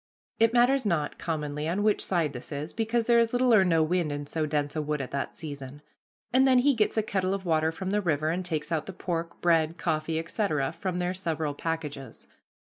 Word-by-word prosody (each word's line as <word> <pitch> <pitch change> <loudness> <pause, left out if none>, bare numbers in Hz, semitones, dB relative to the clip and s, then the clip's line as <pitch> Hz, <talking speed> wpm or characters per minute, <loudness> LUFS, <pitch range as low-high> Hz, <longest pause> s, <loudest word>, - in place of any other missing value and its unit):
It 225 0 +5
matters 250 +3 +4
not, 170 -8 -1
commonly, 150 -2 -3
on 185 +5 0
which 210 -1 +2
side 165 -6 0
this 125 +3 -8
is, 145 +2 -4
because 225 +1 0
there 235 0 +5
is 230 0 +2
little 245 -1 +3
or 205 -3 +7
no 165 -3 +3
wind 170 -1 0
in 145 0 -4
so 155 +1 -2
dense 145 -1 -1
a 155 - 0
wood 150 0 -2
at 135 - -5
that 140 - -3
season; 145 -2 -8 0.5
and 265 +1 +5
then 260 -1 +5
he 280 +3 +4
gets 220 -2 0
a 220 - +3
kettle 190 -2 0
of 195 -1 -7
water 160 -1 +2
from 190 +3 -4
the 210 +1 +1
river, 155 -3 0
and 180 +2 -2
takes 155 -3 -3
out 155 -2 -1
the 195 - -6
pork, 170 -2 -4
bread, 165 -1 +2
coffee, 160 -1 -1
etc., 160 -4 -1
from 185 -2 -4
their 180 0 -1
several 160 -5 -2
packages. 145 -5 -5
165 Hz, 225 wpm, -28 LUFS, 150-200 Hz, 0.5 s, or